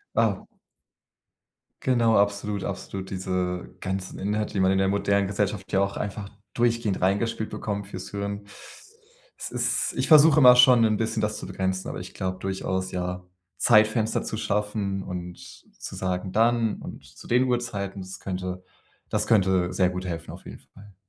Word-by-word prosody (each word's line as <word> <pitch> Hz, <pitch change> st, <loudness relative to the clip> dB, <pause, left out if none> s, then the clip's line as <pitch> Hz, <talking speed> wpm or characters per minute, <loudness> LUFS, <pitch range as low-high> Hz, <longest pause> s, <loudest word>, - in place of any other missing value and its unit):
Ah. -, -, +1 dB, 1.4 s
Genau, 120 Hz, -3 st, +3 dB
absolut, 100 Hz, 0 st, 0 dB
absolut, 95 Hz, -1 st, -5 dB
diese 90 Hz, -1 st, -2 dB
ganzen 95 Hz, 0 st, -4 dB
Inhalte, 105 Hz, +2 st, -2 dB
die 100 Hz, -, -1 dB
man 95 Hz, 0 st, +4 dB
in 95 Hz, -, +2 dB
der 95 Hz, 0 st, +2 dB
modernen 100 Hz, 0 st, +1 dB
Gesellschaft 100 Hz, -1 st, -2 dB
ja 95 Hz, -, +3 dB
auch 100 Hz, 0 st, -1 dB
einfach 100 Hz, 0 st, -5 dB, 0.2 s
durchgehend 115 Hz, -4 st, 0 dB
reingespielt 105 Hz, +4 st, 0 dB
bekommt 100 Hz, -2 st, -4 dB
fürs 95 Hz, -2 st, -7 dB
Hirn. 100 Hz, 0 st, -4 dB, 0.9 s
Es -, -, -6 dB
ist -, -, 0 dB
ich -, -, -1 dB
versuche 155 Hz, -1 st, +7 dB
immer 125 Hz, -3 st, +9 dB
schon 125 Hz, -2 st, +7 dB
'n 110 Hz, -1 st, +2 dB
bisschen, 110 Hz, 0 st, -1 dB
das 105 Hz, 0 st, -1 dB
zu -, -, -7 dB
begrenzen, 95 Hz, 0 st, -2 dB
aber -, -, -5 dB
ich -, -, -9 dB
glaube 95 Hz, 0 st, -3 dB
durchaus, 95 Hz, -1 st, -3 dB
ja, 90 Hz, 0 st, -3 dB, 0.3 s
Zeitfenster 110 Hz, 0 st, +3 dB
zu 110 Hz, -, -4 dB
schaffen 105 Hz, -2 st, -2 dB
und 90 Hz, -1 st, -6 dB, 0.4 s
zu -, -, -7 dB
sagen: 90 Hz, 0 st, -2 dB
„Dann 115 Hz, +1 st, +2 dB
und -, -, -9 dB
zu 70 Hz, +1 st, -14 dB
den 125 Hz, +2 st, +3 dB
Uhrzeiten“, 105 Hz, -6 st, -2 dB
das 95 Hz, +1 st, -8 dB
könnte 90 Hz, -1 st, -5 dB, 0.5 s
das -, -, 0 dB
könnte 95 Hz, -4 st, +3 dB
sehr 90 Hz, -2 st, +3 dB
gut 90 Hz, 0 st, -5 dB
helfen, 85 Hz, -2 st, -5 dB
auf -, -, -12 dB
jeden -, -, -10 dB
Fall. 100 Hz, -1 st, -18 dB
100 Hz, 165 wpm, -25 LUFS, 95-110 Hz, 1.4 s, immer